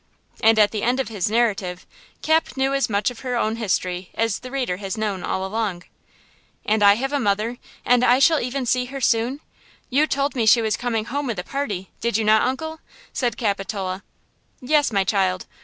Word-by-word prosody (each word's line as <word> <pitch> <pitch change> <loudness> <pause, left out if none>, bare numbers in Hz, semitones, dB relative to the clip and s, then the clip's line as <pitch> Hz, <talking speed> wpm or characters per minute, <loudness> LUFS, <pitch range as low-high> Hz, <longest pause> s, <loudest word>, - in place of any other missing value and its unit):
And 225 0 +5
at 210 -1 +5
the 215 - -3
end 250 +3 +1
of 265 - -1
his 205 -4 -2
narrative 200 -6 0 0.4
Cap 315 -2 +1
knew 270 +1 +1
as 275 -2 +1
much 205 +2 +1
of 245 - -11
her 250 -2 -3
own 225 -1 0
history 185 -4 -2
as 225 -2 0
the 255 - -9
reader 250 -9 -2
has 195 +1 -5
known 205 -4 -2
all 190 +1 -2
along. 195 -3 -3 0.8
"And 215 0 +1
I 200 0 +7
have 270 +5 -3
a 285 - +1
mother, 220 +2 -1 0.3
and 245 0 +4
I 250 0 +5
shall 310 +3 +4
even 255 +2 -3
see 250 +1 +1
her 275 +2 -7
soon! 250 +3 +1 0.5
You 290 +4 +3
told 280 0 -1
me 230 -3 0
she 235 - +7
was 220 -2 0
coming 230 -3 -2
home 280 +4 -3
with 230 -5 -3
the 180 - -3
party–did 225 -3 -3
you 220 - -1
not, 215 0 +5
Uncle?" 315 +5 -4 0.3
said 245 -2 -1
Capitola. 195 -3 -2 0.6
"Yes, 290 +1 +2
my 200 -2 +2
child. 190 -2 0
225 Hz, 200 wpm, -22 LUFS, 200-260 Hz, 0.8 s, I